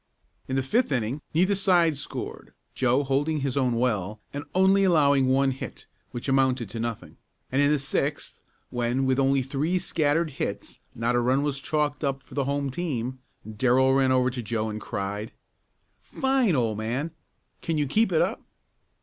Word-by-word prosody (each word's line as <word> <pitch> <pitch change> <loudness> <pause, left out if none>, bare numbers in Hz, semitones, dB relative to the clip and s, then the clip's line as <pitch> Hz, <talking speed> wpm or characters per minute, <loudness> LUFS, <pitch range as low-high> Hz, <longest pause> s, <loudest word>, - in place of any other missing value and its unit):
In 130 - -2
the 135 - +1
fifth 225 - +1
inning 125 +2 -1
neither 185 +5 +3
side 180 -5 +3
scored, 140 - -7 0.2
Joe 130 +2 +2
holding 145 +3 0
his 135 -2 -1
own 130 -4 +1
well, 105 -4 -1
and 145 +1 -4
only 190 +1 +5
allowing 145 -7 +4
one 135 +1 +3
hit, 130 - -8 0.2
which 120 - -6
amounted 130 -5 +1
to 115 - -5
nothing. 115 -1 -5 0.3
And 135 +2 +2
in 145 - +4
the 150 - +3
sixth 140 +1 -3 0.3
when, 120 +2 0
with 130 0 +2
only 135 0 +3
three 145 +7 -1
scattered 155 -1 0
hits, - - -5 0.2
not 115 +2 0
a 120 - +3
run 130 +3 +2
was 145 -2 -1
chalked 150 +1 -1
up 135 -1 -1
for - - -16
the 140 0 0
home 140 0 -1
team, 130 -5 -3 0.3
Darrell 130 +4 +3
ran 135 -1 +3
over 130 0 +3
to 125 0 -4
Joe 110 -1 -2
and 105 0 -6
cried: 105 +4 -4 0.7
"Fine, 265 - +1
old 115 -4 0
man! 125 +9 -2 0.5
Can 165 -2 -1
you 150 - +1
keep 210 +9 +2
it 160 - +4
up?" - - -3
135 Hz, 175 wpm, -26 LUFS, 125-150 Hz, 0.7 s, only